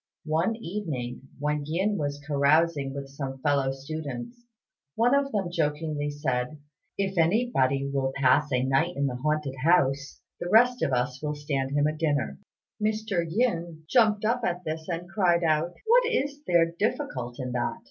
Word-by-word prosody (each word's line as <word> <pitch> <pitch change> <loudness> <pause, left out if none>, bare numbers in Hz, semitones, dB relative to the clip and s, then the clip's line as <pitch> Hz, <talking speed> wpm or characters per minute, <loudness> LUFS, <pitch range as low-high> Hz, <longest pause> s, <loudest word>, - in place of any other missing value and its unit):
One 165 +8 +1
evening 160 - -5
when 150 +1 -1
Yin 190 +7 0
was 145 -1 -2
carousing 145 0 +2
with 140 0 -6
some 135 -1 -6
fellow 140 -2 +2
students, 150 - -6 0.5
one 240 +3 +3
of 280 0 +2
them 195 -5 -1
jokingly 150 -2 -1
said, 145 -1 -2 0.4
"If 195 -2 -1
anybody 160 - +2
will 135 -1 -1
pass 140 +2 +3
a 125 -1 +2
night 135 +7 +1
in 140 - +1
the 125 -2 -2
haunted 150 0 -1
house, 140 -5 +2 0.2
the 175 - -4
rest 245 +4 +5
of - - +1
us 125 +1 -1
will 150 -1 -2
stand 140 -2 -2
him 145 - +3
a 155 +1 0
dinner." 145 - -1 0.4
Mr. 215 -4 0
Yin 170 -6 -1
jumped 215 -1 +3
up 240 +3 +1
at 180 -3 -1
this, 160 0 -4
and 175 0 -3
cried 180 -3 +2
out, 160 +2 +1
"What 475 +2 +5
is 285 - -1
there 170 -1 +3
difficult 125 - -2
in 125 -1 -3
that?" 120 0 -1
155 Hz, 165 wpm, -27 LUFS, 140-185 Hz, 0.5 s, rest